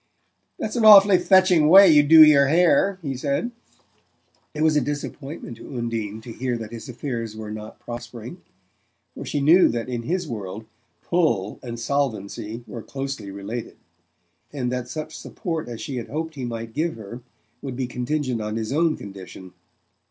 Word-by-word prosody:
"That's 215 - -4
an 235 - 0
awfully 200 -3 +8
fetching 180 -4 +4
way 195 +3 +9
you 150 -3 +7
do 155 +2 +8
your 140 -2 +5
hair," 180 +5 +3
he 135 -3 -3
said. 140 - -2 1.0
It 150 - -1
was 155 -1 +3
a 150 - +3
disappointment 145 -2 -6
to 130 - -9
Undine 110 -2 -4
to 115 0 -9
hear 125 0 -2
that 110 -2 -8
his 115 +2 -9
affairs 115 -3 -5
were 110 -1 -7
not 110 0 -9
prospering, 120 +6 -9 0.7
for - - -8
she 145 - -2
knew 165 +6 +6
that 115 +1 -3
in 120 -2 -3
his 175 +7 -2
world 105 -3 -6 0.4
"pull" 120 - 0
and 120 -2 -7
solvency 115 -3 -3
were 120 - -8
closely 135 -5 -6
related, 100 +4 -7 0.7
and 125 -4 -3
that 125 -1 -3
such 155 +3 -6
support 165 - -5
as 115 -2 -7
she 135 - -5
had 120 - -5
hoped 160 +2 -4
he 135 -4 -5
might 115 -1 -6
give 160 +4 -1
her 115 +3 -9 0.4
would 135 -3 -6
be 130 0 -2
contingent 125 0 -2
on 105 0 -4
his 110 +2 -3
own 160 +1 +1
situation. 95 -2 -11
125 Hz, 170 wpm, -23 LUFS, 115-155 Hz, 1.0 s, way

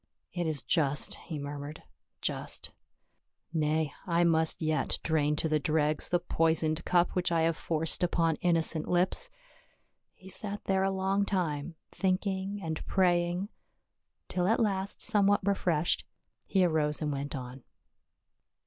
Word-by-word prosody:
" - - -46
It 175 -2 -1
is 150 -5 -3
just," 150 -4 +1
he 160 - -4
murmured, 145 +1 -6 0.2
" - - -55
just. - - -7 0.8
Nay, 155 -1 0
I 170 0 +3
must 160 -1 +3
yet 155 -1 0
drain 150 -2 +1
to 160 - +1
the 155 -1 +2
dregs 150 0 +1
the 175 - +3
poi 165 -1 +1
soned 160 0 +1
cup 175 -1 +3
which 180 -1 0
I 165 -1 +2
have 165 0 +2
forced 160 +2 -1
upon 165 -3 +2
innocent 165 -2 +1
lips." 185 - +2 0.9
He 190 - -16
sat 205 +1 -6
there 190 -1 +1
a 195 - +2
long 195 +1 +1
time 170 -5 -2 0.2
thinking 190 +1 -1
and 160 -1 -3
praying, 175 +1 +1 0.8
till 180 0 0
at 225 - +3
last 200 -3 0
somewhat 205 -3 +3
refreshed, 175 -5 +1 0.4
he 190 -2 +3
arose 155 -3 +1
and 150 -2 -1
went 140 +1 -3
on. 125 0 -7
170 Hz, 150 wpm, -30 LUFS, 155-190 Hz, 0.9 s, I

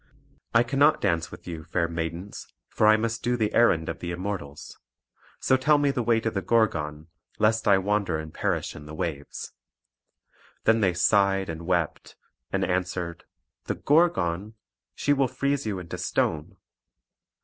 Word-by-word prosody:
"I 115 - +6
cannot 145 +5 +3
dance 85 -4 0
with - - -12
you, 80 -3 -6
fair 85 +2 -1
maidens; 85 +3 -5 0.2
for 105 - +2
I 110 0 +7
must 115 +1 -2
do 120 0 0
the 110 -2 0
errand 85 -9 +3
of - - -4
the 85 - -5
Immortals. 85 -5 -6 0.6
So 130 - +3
tell 150 +3 +4
me 145 -1 +2
the 130 - -1
way 115 -1 +2
to 115 - -1
the 100 - -2
Gorgon, 80 -10 0 0.3
lest 110 +1 +2
I 100 -2 +6
wander 100 -3 0
and 80 0 -7
perish - - -2
in 75 0 -10
the 75 - -8
waves." 75 -3 -5 1.1
Then 110 +1 +4
they 95 -4 +2
sighed 95 +1 +3
and 80 +1 -6
wept; 85 -4 -1 0.4
and - - 0
answered: 90 -2 -2 0.4
"The - - -2
Gorgon! 110 - +1 0.4
she 145 - +2
will 135 -2 +2
freeze 140 0 -1
you 100 -3 -2
into 90 -2 -7
stone." 75 -2 -1
95 Hz, 160 wpm, -26 LUFS, 85-115 Hz, 1.1 s, I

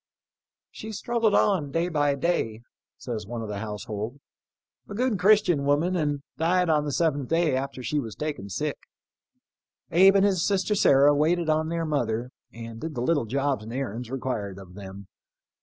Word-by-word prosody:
" - - -68 0.3
She 220 - -8
struggled 230 0 +1
on, 185 -9 +2
day 165 +5 0
by 145 -4 +1
day," 125 -8 -1 0.4
says 115 -6 -5
one 115 0 -5
of 110 - -6
the 100 -1 -4
household, 110 +3 -5 0.3
" - - -41
a 200 - -6
good 240 -3 0
Christian 185 -7 +4
woman, 150 +6 +2
and 145 -4 -1 0.2
died 175 +1 +2
on 150 -1 +2
the 145 - -2
seventh 145 -3 0
day 165 -4 +2
after 130 -1 -4
she 145 +5 0
was 115 -6 -6
taken 150 -10 -4
sick. 150 +9 -3 1.1
Abe 190 +3 +6
and 195 0 +5
his 190 -5 +2
sister 195 0 +1
Sarah 145 -7 +5
waited 160 +2 +2
on 155 +1 0
their 165 0 -1
mother, 125 -5 -1 0.2
and 115 0 -9
did 160 -2 -5
the 120 - -2
little 145 -1 +1
jobs 135 +1 -1
and 110 - -8
errands 125 -2 -4
required 120 -7 -3
of 95 -2 -12
them. 100 0 -9
145 Hz, 180 wpm, -26 LUFS, 115-170 Hz, 1.1 s, Abe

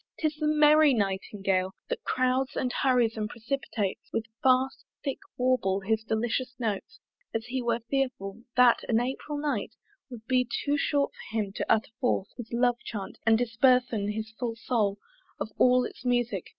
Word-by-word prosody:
'Tis 310 -1 0
the 305 -1 0
merry 300 -1 +6
Nightingale 195 -2 -1
That - - -4
crowds, 255 +1 0
and 250 -1 -1
hurries, 245 -4 +2
and 210 -1 -2
precipitates 230 -4 -3
With 225 - -1 0.2
fast 260 +1 +3 0.2
thick 275 - -2 0.2
warble 250 -7 +1
his 220 +2 0
delicious 235 +3 -1
notes, 215 -5 -3 0.4
As 225 0 -1
he 255 +1 -2
were 235 -1 0
fearful, 230 -6 -2
that 250 -1 +6
an 230 -1 +4
April 265 +4 -3
night 290 -8 -2 0.3
Would 235 -3 -10
be 250 -1 +1 0.2
too 290 0 +2
short 285 0 +1
for 225 - -7
him 205 -3 -1
to - - -2
utter 220 0 +2
forth 245 -6 0
His 240 -3 -8
love 240 0 +2
chant, 205 -4 -6
and 225 0 +6
disburthen 240 -2 +2
his 220 0 -5
full 235 -3 -2
soul 220 -4 0 0.4
Of 220 - -4
all 250 0 +5
its - - -9
music! 245 -6 0
240 Hz, 165 wpm, -28 LUFS, 220-255 Hz, 0.4 s, merry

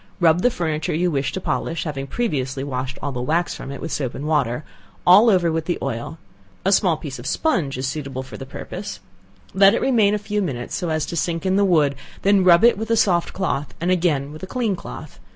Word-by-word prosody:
Rub 170 0 +4
the 245 - +4
furniture 160 -8 -2
you 175 +2 +1
wish 140 -1 -1
to - - -2
polish 170 -2 -2
(having 140 -4 -4
previously 135 - -2
washed 130 -1 -4
all 145 - -1
the 125 -2 -4
wax 165 +7 0
from 135 - -7
it 140 - -7
with 160 - -5
soap 130 -4 -2
and 145 - -5
water) 145 -4 0 0.4
all 200 +6 +7
over 180 -5 +3
with 160 0 -2
the 175 - -1
oil; 125 +4 -4 0.5
a 195 - +3
small 180 -5 +3
piece 140 -5 -7
of 120 - -7
sponge 155 - 0
is 130 - -2
suitable 135 -2 -4
for 130 - -11
the - - -7
purpose, - - -7 0.5
let 195 +2 +6
it - - +1
remain 220 -6 +3
a - - +1
few 210 0 -2
minutes 130 -10 -4
so 175 - -2
as 155 -1 0
to - - -5
sink 165 +2 -1
in 190 0 +2
the 200 - +4
wood; 155 -7 +3 0.3
then 200 -1 +4
rub 180 +2 +6
it 235 - +7
in - - -10
with 220 0 -4
a 230 - +3
soft 175 -5 +2
cloth, 150 -7 -2
and 175 +3 0
again 155 -6 +1
with 155 - -10
a 190 - -6
clean 225 -3 -1
cloth. - - -10
165 Hz, 240 wpm, -22 LUFS, 140-190 Hz, 0.5 s, all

